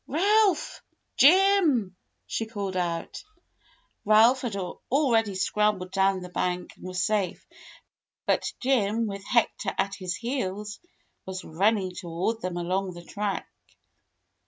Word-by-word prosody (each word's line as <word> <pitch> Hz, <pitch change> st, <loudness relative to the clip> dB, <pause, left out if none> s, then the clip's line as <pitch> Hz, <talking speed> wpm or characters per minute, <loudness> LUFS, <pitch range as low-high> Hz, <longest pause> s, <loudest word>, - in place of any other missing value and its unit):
"Ralph! 395 Hz, +3 st, +2 dB, 0.3 s
Jim!" 320 Hz, -, +5 dB, 0.3 s
she 225 Hz, -, -3 dB
called 200 Hz, -4 st, -4 dB
out. 170 Hz, -, -3 dB, 0.8 s
Ralph 225 Hz, +5 st, +5 dB
had 235 Hz, -5 st, -3 dB
already 225 Hz, +2 st, 0 dB
scrambled 195 Hz, -1 st, 0 dB
down 195 Hz, -1 st, +2 dB
the 180 Hz, -, -8 dB
bank 180 Hz, 0 st, -3 dB
and -, -, -10 dB
was 185 Hz, -1 st, -2 dB
safe, 205 Hz, -5 st, -1 dB, 0.8 s
but -, -, +1 dB
Jim, 230 Hz, -4 st, +2 dB
with 200 Hz, -2 st, -5 dB
Hector 220 Hz, -3 st, 0 dB
at 195 Hz, 0 st, 0 dB
his 185 Hz, -3 st, -4 dB
heels, 210 Hz, -4 st, -4 dB, 0.5 s
was 190 Hz, 0 st, -5 dB
run 195 Hz, +8 st, +2 dB
ning 190 Hz, -3 st, -3 dB
toward 180 Hz, +6 st, -3 dB
them 180 Hz, -1 st, -3 dB
along 185 Hz, +1 st, -2 dB
the 175 Hz, -, -10 dB
track. 205 Hz, +1 st, -3 dB
200 Hz, 125 wpm, -26 LUFS, 185-235 Hz, 0.8 s, Jim